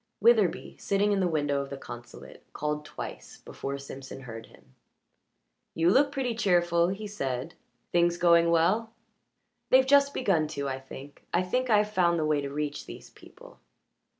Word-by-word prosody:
Witherbee, 210 -5 +2
sitting 200 +1 +1
in 200 - +1
the 185 - +2
window 145 -4 0
of 140 - -7
the 140 - -6
consulate, 120 -2 -11
called 150 0 -3
twice - - -8
before 140 0 -6
Simpson 135 -1 -9
heard 115 -3 -9
him. 65 - -22 1.0
"You 165 +2 +3
look 280 +6 +4
pretty 260 -4 -2
cheerful," 175 -6 +2
he 195 +4 -4
said. 135 -7 -4 0.4
"Things 175 0 +2
going 170 -1 +4
well?" 195 +8 +2 0.8
"They've 260 0 +6
just 280 +1 +5
begun 175 -10 +1
to, 140 0 -2
I 135 -1 -3
think 135 +1 -12
I 175 - +2
think 250 +7 -1
I've 210 -1 +3
found 175 -3 +3
the 155 - 0
way 150 -1 +1
to 140 - -4
reach 145 0 -4
these - - -11
people." - - -16
170 Hz, 165 wpm, -28 LUFS, 140-205 Hz, 1.0 s, They've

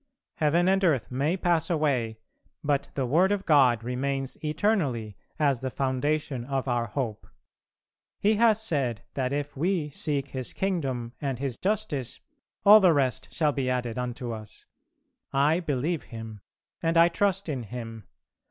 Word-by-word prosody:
Heaven 170 +3 +3
and 195 +1 +3
earth 150 -10 +2
may 145 +8 0
pass 170 -3 +1
away, 135 -9 0 0.5
but 145 -2 0
the 135 - 0
word 170 +10 +3
of 200 -1 -1
God 130 -8 +4
remains 135 +2 -2
eternally 150 - 0 0.2
as 140 -5 +2
the 130 - -2
foundation 135 0 -1
of 135 +1 -2
our 120 -2 0
hope. 110 -1 -4 0.9
He 210 +1 +3
has 220 -1 +4
said 140 - -1
that 130 -2 -1
if 145 0 -3
we 160 0 0
seek 140 -1 -2
His 130 -2 -5
kingdom 135 -11 -2
and 135 -4 -2
His 135 -1 -3
justice 190 - -2 0.5
all 210 +2 +10
the 185 -4 +5
rest 130 -5 0
shall 150 -2 +1
be 135 -2 -1
added 125 -2 -2
unto 125 -1 -4
us. 110 -2 -9 0.7
I 145 +5 +3
believe 155 0 -2
Him, 115 -3 -9 0.4
and 165 0 +1
I 170 0 +8
trust 195 +2 0
in 140 -5 -2
Him. 115 -1 -8
140 Hz, 150 wpm, -27 LUFS, 125-165 Hz, 0.9 s, all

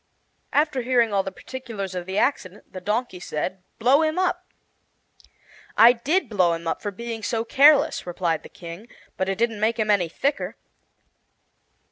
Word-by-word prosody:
After 295 -3 +1
hearing 240 -3 +2
all 195 - +3
the 190 - -6
particulars 215 -4 -7
of 180 -1 -5
the 190 +1 -3
accident, 205 -7 -1
the 185 - -7
Donkey 210 0 -2
said: 180 +2 -4 0.2
"Blow 260 +6 +4
him 315 +1 0
up." 365 0 0 1.3
"I 235 +2 +8
did 290 +8 0
blow 185 -6 +2
him 165 0 -5
up, - - -2
for 205 - -3
being 230 +3 -6
so 225 +1 -2
careless," 280 -4 +4
replied 170 -2 -1
the - - -13
King; 170 +5 -10 0.3
"but 190 0 -1
it 195 - -1
didn't 230 -1 0
make 220 +2 +1
him 215 -2 +1
any 180 -5 +2
thicker." 280 - -2
220 Hz, 165 wpm, -24 LUFS, 185-255 Hz, 1.3 s, I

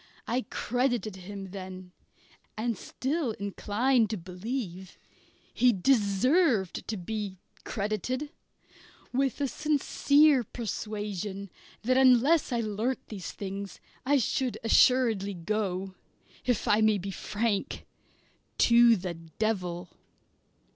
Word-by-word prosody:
I 240 -1 -1
credited 245 -4 -1
him 190 0 -8
then, 185 -1 -8 0.7
and 230 +1 -1
still 265 - -2
incline 215 +4 +1
to 215 +1 -3
believe 185 +1 -6 0.6
he 250 0 +4
deserved 225 - +2
to 220 - -2
be 200 +1 -4 0.3
credited, 225 - -2 0.8
with 270 +1 0
a 280 - +1
sincere 295 -1 +3
persuasion 205 -3 -5 0.3
that 255 +3 +2
unless 265 +5 +5
I 240 -1 +1
learnt 220 +4 -2
these 200 -5 -6
things 200 0 -6 0.2
I 285 +2 +3
should 255 0 0
assuredly 225 -4 +4
go 190 0 -2 0.5
if 245 -4 0
I 210 +1 +4
may 215 -1 +4
be 195 +1 -5
frank 210 +1 -2 0.7
to 235 0 +6
the 180 -3 -4
devil. 175 +1 -3
215 Hz, 105 wpm, -29 LUFS, 195-250 Hz, 0.8 s, to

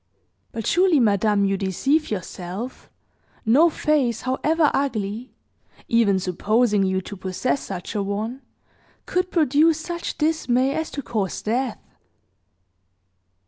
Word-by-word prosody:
But 225 -2 -5
surely, 360 -3 +4
madame, 205 -2 +3
you 195 0 +1
deceive 270 - 0
yourself; 190 +4 -6 0.6
no 285 +10 +5
face, 285 -7 0
however 300 +4 +1
ugly 230 -3 -2 0.6
even 225 -4 +3
supposing 205 +4 +1
you 190 0 +1
to 200 - -8
possess 190 +8 -2
such 180 -3 -6
a 210 - -1
one 215 +6 -3 0.6
could 365 0 -1
produce 315 -1 +3
such 340 +1 -5
dismay 275 -4 +1
as 320 +1 -2
to 280 - -6
cause 205 -7 -3
death." 240 +1 -1
235 Hz, 115 wpm, -23 LUFS, 200-295 Hz, 0.6 s, no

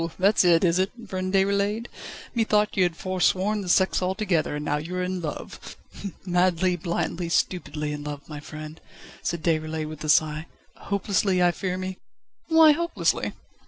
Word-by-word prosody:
that's 195 +3 +4
it, 170 -1 +5
is 175 0 +3
it, 190 +1 +2 0.2
friend 185 0 -3
Déroulède? 200 +3 +1 0.5
Methought 210 -2 +2
you 190 - +2
had 175 -2 +1
foresworn 190 +3 +1
the 185 - -6
sex 190 +1 +3
altogether, 185 -5 0
and 150 0 -4
now 150 - +1
you 165 +5 -5
are 180 - -1
in 180 0 -3
love." 155 -3 -7 0.5
"Madly, 180 0 +2
blindly, 170 0 -2
stupidly 150 -4 -1
in 145 0 -6
love, 145 -1 -6
my 150 -2 -7
friend," 155 +1 -9 0.4
said 170 -2 -3
Déroulède 155 -1 0
with 155 -1 -8
a 155 - -3
sigh. 155 +1 +3 0.3
"Hopelessly, 195 -2 0
I 175 - +5
fear 185 +1 -3
me!" 185 0 -5 0.5
"Why 320 -1 +7
hopelessly?" 340 +3 0
180 Hz, 160 wpm, -25 LUFS, 160-195 Hz, 0.5 s, Why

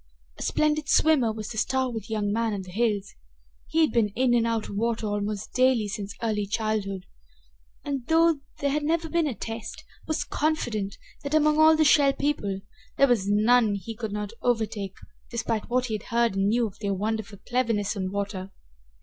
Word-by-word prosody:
A - - -8
splendid 305 0 +1
swimmer 285 -8 +4
was 215 -1 -6
the 220 - -3
stalwart 250 -5 -1
young 210 -2 -1
man 225 -1 0
of 195 - -5
the 185 - -11
hills. 205 -1 0 0.5
He 325 - +1
had 315 - +4
been 230 -3 +3
in 250 0 +3
and 230 -1 +3
out 230 -1 -1
of - - -7
water 230 +1 -1
almost 205 0 -3
daily 255 -4 +3
since 200 -1 -5
early 210 -3 0
childhood, 205 -3 -2 0.8
and, 275 -4 -3
though 330 -1 +4 0.2
there 280 -1 0
had 300 +2 0
never 325 +2 0
been 335 -1 +1
a 260 - -3
test, 225 0 -6 0.2
was 315 - 0
confident 235 -10 -1 0.2
that, 285 +2 -2
among 305 0 +4
all 315 0 +7
the 310 - +4
Shell 285 -2 +5
People, 205 -11 -1 0.4
there 275 - +6
was 215 -6 +1
none 215 +1 +4
he 215 +3 -6
could 220 -2 -4
not 210 +1 -4
overtake, 215 -5 -1 0.3
despite 225 -2 -2
what 250 +1 +1
he 230 - -4
had 215 - -3
heard 235 -3 +2
and 195 0 +2
knew 235 +3 +2
of 200 -3 -8
their 200 -2 -1
wonderful 210 0 -3
cleverness 230 -5 0
in 190 -2 -2
the 185 - -3
water. 200 -1 -3
225 Hz, 190 wpm, -26 LUFS, 205-260 Hz, 0.8 s, all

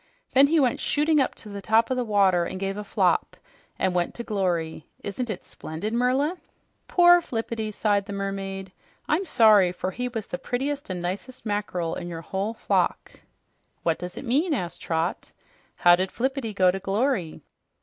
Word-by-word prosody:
Then 270 +2 +7
he 320 +2 +3
went 255 -4 +2
shooting 300 +1 +2
up 265 - +1
to 215 - -10
the 200 -1 -6
top 225 +4 +3
of - - +2
the 250 - 0
water 195 -5 +3
and 185 - -5
gave 195 0 -2
a 210 - -5
flop - - +1 0.4
and 190 -1 +1
went 175 -1 -1
to 235 - -5
glory! 175 -8 -2 0.2
Isn't 230 +5 -4
it 195 -4 -4
splendid, 165 +8 -6
Merla?" 260 +8 +1 0.5
"Poor 350 0 +6
Flippity!" 225 -5 -3
sighed 205 -1 +1
the 200 - -5
mermaid. 195 -1 -4 0.4
"I'm 345 +6 +1
sorry, 215 - +5
for 185 +1 -4
he 250 +6 -3
was 225 -4 -4
the 175 - -5
prettiest 275 +2 -3
and 180 -2 -4
nicest 205 +9 -5
mackerel 205 -5 -2
in 175 - -5
your 165 -1 -6
whole 195 +6 -3
flock." - - -1 0.6
"What 165 -1 +1
does 180 +1 -7
it - - -6
mean?" 295 +7 +2
asked 175 -8 -4
Trot. 165 +2 -2 0.4
"How 175 0 +6
did 185 +1 -2
Flippity 265 -2 -2
go 185 -2 +5
to 195 - -4
glory?" 195 - -1
205 Hz, 180 wpm, -25 LUFS, 185-250 Hz, 0.6 s, Then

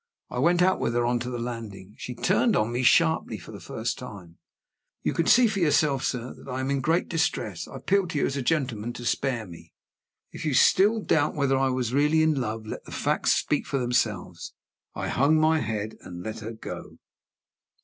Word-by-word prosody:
I - - -3
went 175 +1 +4
out 185 +1 +3
with 115 - -1
her 120 0 +2
on 120 0 +1
to 120 +1 -4
the 125 - -4
landing. 115 -5 -6
She 125 - -7
turned 195 - +2
on 110 -4 +1
me 120 +2 -1
sharply 160 +5 +3
for - - -12
the - - -9
first 115 +1 -4
time. 95 -9 -10 0.6
"You - - 0
can 165 - 0
see 250 0 +6
for 210 -3 0
yourself, 150 -4 +2
sir, 125 -1 -3
that - - -13
I 130 +1 -3
am 130 +1 -1
in 140 -1 0
great 165 +5 +1
distress. 165 -1 -1
I - - -11
appeal 195 -1 +1
to 155 - -4
you, - - +2
as 140 - -2
a 140 - -1
gentleman, 120 -6 -1
to 120 - -8
spare 120 -2 -1
me." 85 -2 -13 0.6
If - - -8
you 150 -4 0
still 210 - +5
doubt 145 -6 +1
whether 140 -2 +2
I 135 0 +2
was 125 -2 -1
really 150 +3 +3
in 160 0 +3
love, 110 -1 -4
let 110 - -6
the - - -11
facts - - +1
speak - - 0
for 140 - -1
themselves. 110 -8 -2 0.4
I - - -3
hung 145 +5 +3
my 160 0 +3
head, 110 -3 -3
and 90 -1 -9
let 110 +2 -5
her 110 +1 -6
go. 110 - -8
130 Hz, 215 wpm, -26 LUFS, 115-155 Hz, 0.6 s, see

